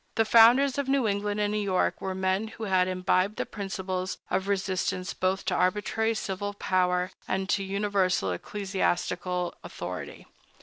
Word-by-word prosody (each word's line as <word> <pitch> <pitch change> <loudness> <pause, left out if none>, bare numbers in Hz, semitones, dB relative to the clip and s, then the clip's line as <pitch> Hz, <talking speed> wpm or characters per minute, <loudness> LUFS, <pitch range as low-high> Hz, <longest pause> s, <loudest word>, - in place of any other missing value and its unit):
The 225 - +3
founders 250 +5 +6
of 280 - -1
New 270 -4 +2
England 205 0 -1
and 205 0 +1
New 210 - 0
York 195 -3 0
were 190 -1 -3
men 190 +3 0
who 220 +1 -9
had 185 -3 +2
imbibed 185 +2 +1
the - - -2
principles 190 -2 -4
of 190 - 0
resistance 190 -2 -1
both 185 +1 -1
to 185 - 0
arbitrary 215 +4 +1
civil 205 0 -3
power 180 -2 +1 0.2
and 190 0 -1
to 200 - +1
universal 195 - 0
ecclesiastical 180 - -2
authority. - - -7
195 Hz, 150 wpm, -27 LUFS, 185-210 Hz, 0.2 s, founders